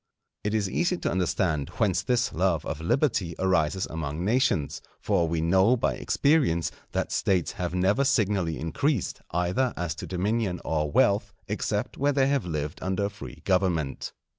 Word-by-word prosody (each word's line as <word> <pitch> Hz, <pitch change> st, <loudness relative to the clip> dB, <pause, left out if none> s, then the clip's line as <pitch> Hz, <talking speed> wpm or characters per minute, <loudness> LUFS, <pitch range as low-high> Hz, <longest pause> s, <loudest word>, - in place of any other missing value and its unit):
It 105 Hz, +1 st, 0 dB
is 105 Hz, -2 st, +1 dB
easy 175 Hz, -, 0 dB
to -, -, -2 dB
understand 85 Hz, -5 st, 0 dB
whence 100 Hz, -6 st, +2 dB
this 125 Hz, -1 st, 0 dB
love 85 Hz, -3 st, +1 dB
of 80 Hz, -, -4 dB
liberty 90 Hz, -, +1 dB
arises 95 Hz, -1 st, +1 dB
among 80 Hz, +1 st, -4 dB
nations, 110 Hz, -, +1 dB, 0.2 s
for 85 Hz, -, +1 dB
we 80 Hz, 0 st, -1 dB
know 95 Hz, +9 st, +4 dB
by 120 Hz, -, +1 dB
experience 125 Hz, -, +2 dB, 0.2 s
that -, -, -1 dB
States 90 Hz, -4 st, +1 dB
have 90 Hz, 0 st, -4 dB
never 95 Hz, +9 st, +2 dB
signally 100 Hz, -, +1 dB
increased, 120 Hz, -, -1 dB
either 90 Hz, +9 st, 0 dB
as 90 Hz, -3 st, -2 dB
to -, -, -6 dB
dominion 95 Hz, 0 st, -1 dB
or 75 Hz, -2 st, 0 dB
wealth, 100 Hz, +4 st, +2 dB
except 105 Hz, +3 st, -2 dB
where 145 Hz, +1 st, +2 dB
they 135 Hz, -1 st, +3 dB
have 135 Hz, -7 st, 0 dB
lived 75 Hz, -3 st, -3 dB
under 95 Hz, +2 st, -1 dB
a -, -, -1 dB
free 100 Hz, +1 st, -10 dB
government. 90 Hz, -7 st, 0 dB
95 Hz, 165 wpm, -27 LUFS, 85-110 Hz, 0.2 s, know